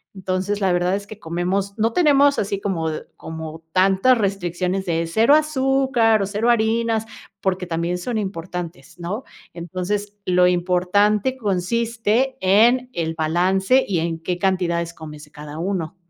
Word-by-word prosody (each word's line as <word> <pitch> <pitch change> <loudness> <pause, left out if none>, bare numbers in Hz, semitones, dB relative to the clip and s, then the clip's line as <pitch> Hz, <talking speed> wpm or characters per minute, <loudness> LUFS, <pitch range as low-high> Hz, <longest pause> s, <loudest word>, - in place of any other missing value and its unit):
Entonces, 190 +2 -2
la 190 - +2
verdad 180 +2 +1
es 200 0 -5
que 210 0 -11
comemos, 185 +4 -2
no 225 +1 +1
tenemos 285 -3 +4
así 200 -1 -2
como 175 -5 -2
d 155 - -5
como 160 0 -8
tantas 195 +7 +4
restricciones 190 -2 -2
de 165 -1 0
0 225 - +4
azúcar 265 -7 +2
o - - +1
0 210 +4 -1
harinas 225 -1 +1 0.4
porque 185 -1 -1
también 170 +1 -2
son 235 +4 -3
importantes, 175 -7 -6
¿no? 200 +9 -4 0.3
Entonces, 185 +5 -4
lo 180 0 +4
importante 190 +7 +1
consiste 230 +4 0
en 235 +7 +4
el 165 -1 -2
balance 185 +9 +2
y 180 -4 0
en 165 0 -2
qué 175 +2 -3
cantidades 170 -3 0
comes 150 -2 -10
de 150 - -25
cada 150 0 -9
uno. 180 -2 -3
190 Hz, 150 wpm, -21 LUFS, 175-220 Hz, 0.4 s, tenemos